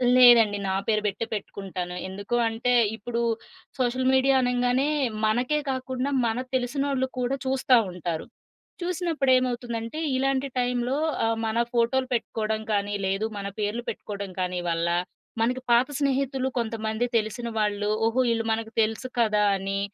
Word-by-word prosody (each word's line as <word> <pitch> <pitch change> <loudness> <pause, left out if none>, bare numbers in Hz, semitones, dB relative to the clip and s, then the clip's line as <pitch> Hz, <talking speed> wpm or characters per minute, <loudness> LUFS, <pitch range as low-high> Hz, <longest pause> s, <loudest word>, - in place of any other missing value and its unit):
లేదండి 235 -5 +7
నా 190 - 0
పేరు 215 -1 +2
పెట్టే 205 +2 -1
పెట్టుకుంటాను. 190 -3 -5
ఎందుకు 200 +5 -4
అంటే, 230 +2 0 0.2
ఇప్పుడు 235 +2 -3 0.6
సోషల్ 255 0 +1
మీడియా 265 +1 +4
అనంగానే 250 +2 +1 0.4
మనకే 245 +7 +1
కాకుండా 260 +1 -2 0.2
మనకు 245 +3 -2
తెలిసినోళ్ళు 260 +1 0
కూడా 250 +2 0
చూస్తా 260 -1 +3 0.2
ఉంటారు. 170 -2 -4 0.6
చూసినప్పుడు 345 -6 0
ఏమవుతుందంటే, 240 +1 -3 0.2
ఇలాంటి 270 +1 +1
టైమ్‌లో 245 +1 0 0.3
ఆహ్, 225 0 +1
మన 220 +1 -1 0.2
ఫోటోలు 245 +2 +2
పెట్టుకోవడం 220 -2 -1
కానీ, 205 0 0
లేదు 195 +3 0
మన 200 0 -4
పేర్లు 210 +3 -1
పెట్టుకోవడం 200 -2 -6
కానీ 180 0 -1
వల్ల 165 0 0 0.5
మనకి 250 +3 +1
పాత 240 +2 +5
స్నేహితులు 270 -1 0
కొంతమంది 220 0 -1
తెలిసిన 220 +2 -2
వాళ్ళు, 210 -1 0 0.2
ఓహో! 225 +3 +1
వీళ్ళు 225 -1 0
మనకు 225 0 -4
తెలుసు 220 +3 -1
కదా! 215 -2 +3
అని 195 +1 -2
235 Hz, 135 wpm, -26 LUFS, 215-255 Hz, 0.6 s, లేదండి